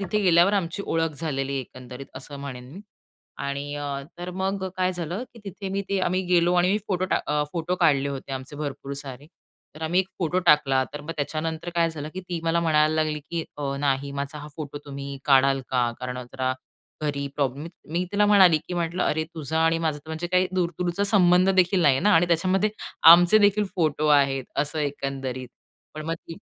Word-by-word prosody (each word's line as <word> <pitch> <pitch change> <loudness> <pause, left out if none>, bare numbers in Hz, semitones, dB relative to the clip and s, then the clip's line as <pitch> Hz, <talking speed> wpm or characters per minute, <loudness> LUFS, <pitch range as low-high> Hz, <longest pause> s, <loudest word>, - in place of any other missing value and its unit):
तिथे 200 +2 -1
गेल्यावर 180 +1 +5
आमची 195 0 -1
ओळख 165 -1 0
झालेली 140 -4 -2
आहे, 135 - -1
एकंदरीत 130 +1 -10
असं 140 +2 -8
म्हणेन 125 -3 -7
मी. 195 - -9 0.6
आणि 140 +1 -4
अ, 145 0 -4 0.3
तर 175 +1 -5
मग 190 +1 -2
काय 185 0 +1
झालं, 175 +7 -4
की - - -13
तिथे 195 0 -6
मी 195 +1 -2
ते, 200 -1 0
आम्ही 185 +1 +1
गेलो 175 0 +3
आणि 180 +1 +3
मी 210 - +2
फोटो 185 -1 0
टाक - - 0
अ, 150 0 +2
फोटो 175 +1 -1
काढले 140 -4 +3
होते 135 -1 -6
आमचे, 135 +2 -6
भरपूर 140 -2 -5
सारे. 135 0 -9 0.5
तर 155 - -10
आम्ही 170 +4 +2
एक 190 - -5
फोटो 175 0 0
टाकला. 135 -3 +4
तर 145 - -6
मग 150 +3 -7
त्याच्यानंतर 160 +3 -3
काय 170 -1 +2
झालं, 155 -2 -6
की 185 - -4
ती 175 -2 -3
मला 165 +1 +2
म्हणायला 155 -1 +3
लागली, 155 -1 0
की 170 -1 -2
अ, 140 -1 -3
"नाही 140 0 0
माझा 140 +2 -4
हा 150 +1 -9
फोटो 145 -2 -6
तुम्ही 140 -1 -7
काढाल 135 -1 +4
का? 125 -2 +2
कारण 125 0 -4
जरा 130 -1 -1 0.5
घरी 140 -2 -2
प्रॉब्लेम" 140 +2 -1 0.3
मी 175 +2 0
तिला 205 +1 +3
म्हणाली, 190 -6 +6
की 180 - -3
म्हटलं, 170 +1 -1
"अरे, 155 +1 0
तुझा 160 0 -3
आणि 165 0 +2
माझा 160 -3 -1
तर 150 - -18
म्हणजे 160 +2 -3
काही 185 +1 +2
दूर-दूरचा 180 +2 -1
संबंध 185 -2 +4
देखील 185 0 +4
नाही 145 -4 +5
आहे 135 - 0
ना. 210 - +5
आणि 165 +2 +4
त्याच्यामध्ये 185 +5 +2 0.4
आमचे 175 +5 +8
देखील 205 0 +3
फोटो 155 -3 0
आहेत, 140 -2 +3
असं 150 +2 -1
एकंदरीत." 135 -3 -4 0.5
पण 155 0 -6
मग 165 - -1
ती 165 0 -11
160 Hz, 205 wpm, -25 LUFS, 140-180 Hz, 0.6 s, आमचे